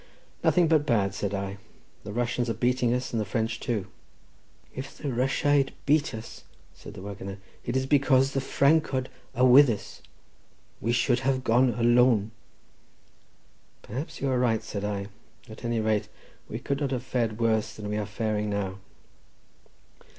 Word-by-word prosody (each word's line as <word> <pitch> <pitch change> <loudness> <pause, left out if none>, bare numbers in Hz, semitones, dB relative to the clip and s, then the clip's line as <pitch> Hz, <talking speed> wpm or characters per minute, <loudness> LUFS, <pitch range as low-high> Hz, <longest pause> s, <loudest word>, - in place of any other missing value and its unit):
"Nothing 175 -2 +4
but 155 -2 +4
bad," 105 -8 +1
said 100 0 -2
I; 100 0 -4 0.4
"the 105 - -7
Russians 120 +1 -1
are 115 - -1
beating 125 +1 +1
us 125 +1 -2
and 115 - +1
the - - 0
French 115 +1 -2
too." 110 -6 -2 0.9
"If 135 +2 -7
the 145 - -4
Rusiaid 135 +2 +2
beat 150 -3 +2
us," 110 +1 -9 0.3
said - - -12
the - - -9
waggoner, 100 -1 -7 0.3
"it 120 +2 -1
is 130 - 0
because 135 -1 +3
the 135 - 0
Francod 140 -1 +2 0.3
are 125 - +4
with 130 +2 +8
us. 110 - -5 0.8
We 115 - -1
should 120 +1 +2
have 130 0 0
gone 120 +1 +3
alone." 120 -3 +4 1.5
"Perhaps 130 +9 -6
you 135 -1 0
are 125 - +1
right," 115 -3 +1
said 105 -2 -5
I; 100 -1 -2 0.4
"at 110 - -11
any 120 -1 0
rate, 110 -1 +1 0.4
we - - -4
could 140 +1 -3
not 140 - 0
have 125 -2 -2
fared 115 -4 -1
worse 110 -1 +1
than 105 -1 -6
we 105 0 -2
are 105 -1 -2
faring 105 -1 -2
now." 100 -1 -3
120 Hz, 165 wpm, -27 LUFS, 105-130 Hz, 1.5 s, with